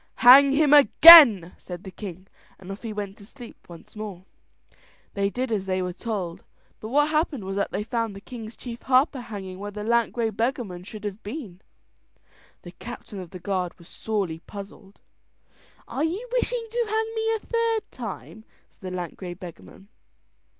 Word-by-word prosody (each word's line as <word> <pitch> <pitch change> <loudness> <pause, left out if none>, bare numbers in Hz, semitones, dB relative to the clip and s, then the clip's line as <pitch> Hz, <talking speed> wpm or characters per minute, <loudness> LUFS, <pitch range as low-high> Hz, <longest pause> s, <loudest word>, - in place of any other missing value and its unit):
"Hang 275 +3 +9
him 295 0 +3
again," 285 - +9
said 180 0 -9
the 190 - -9
king, 185 -1 -9 0.3
and 190 0 -10
off 195 - -8
he 225 - -6
went 205 -1 -6
to 200 - -14
sleep 245 -5 -14
once 170 +4 -14
more. 200 -4 -8 0.9
They 200 0 0
did 250 +3 -4
as 195 -3 -2
they 185 0 -1
were 180 -1 -4
told, 190 -4 -5 0.4
but 215 - -8
what 295 +4 +2
happened 305 - -1
was 195 +1 -5
that 200 - -1
they 210 - -3
found 230 -2 -3
the - - -8
king's 225 +1 -10
chief 240 -2 -8
harper 265 +1 +2
hanging 195 -5 -8
where 205 +1 -6
the 210 0 -7
lank 235 +1 +1
grey 230 -2 -1
beggarman 220 -5 -3
should 215 +1 -10
have 205 +1 -6
been. 205 - -8 1.0
The 175 - -10
captain 220 0 -10
of 180 -2 -9
the 185 - -9
guard 185 -1 -3
was 170 - -16
sorely 195 -7 -3
puzzled. 200 +1 -12 0.9
"Are 280 - -3
you 370 +10 -3
wishful - - 0
to 475 0 -1
hang 445 +1 -1
me 445 0 0
a - - -4
third 460 -1 -2
time?" 220 -2 -8 0.3
said - - -36
the 185 -1 -6
lank 175 -3 -6
grey 180 -2 -7
beggarman. 175 - -13
210 Hz, 180 wpm, -24 LUFS, 190-260 Hz, 1.0 s, Hang